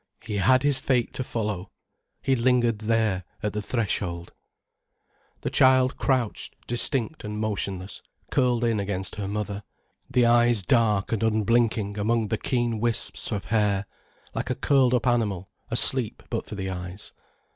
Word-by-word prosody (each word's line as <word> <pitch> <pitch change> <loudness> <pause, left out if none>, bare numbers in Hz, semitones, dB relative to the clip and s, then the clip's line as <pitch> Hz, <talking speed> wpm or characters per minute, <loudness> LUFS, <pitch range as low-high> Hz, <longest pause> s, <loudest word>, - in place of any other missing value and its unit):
He 105 -3 -3
had 130 +7 +4
his 145 -2 +3
fate 125 -4 +1
to 130 - -2
follow, 105 -6 -3 0.5
he 135 - +3
lingered 120 -2 +2
there 110 -4 +1 0.2
at 105 - -1
the 105 - -2
threshold. 100 -6 -2 1.1
The - - -2
child 130 0 +4
crouched 130 -5 -1
distinct 125 +4 -1
and 105 0 -5
motionless, 100 -3 -3 0.3
curled 125 -3 +2
in 115 -3 +2
against 95 -1 -3
her 100 -2 -3
mother, 105 0 -3 0.5
the 125 -2 +3
eyes 120 -3 +4
dark 105 -1 +2
and 115 - 0
unblinking 110 -1 +1
among 110 +1 +1
the 110 - -1
keen 120 -3 0
wisps 115 +1 -1
of 105 -3 -3
hair, 105 -2 +2 0.5
like - - -3
a - - 0
curled 130 -3 +3
up 120 - 0
animal 105 -7 0 0.2
asleep - - 0
but - - -2
for - - -6
the 95 -1 -3
eyes. 90 +2 -7
110 Hz, 150 wpm, -26 LUFS, 100-120 Hz, 1.1 s, had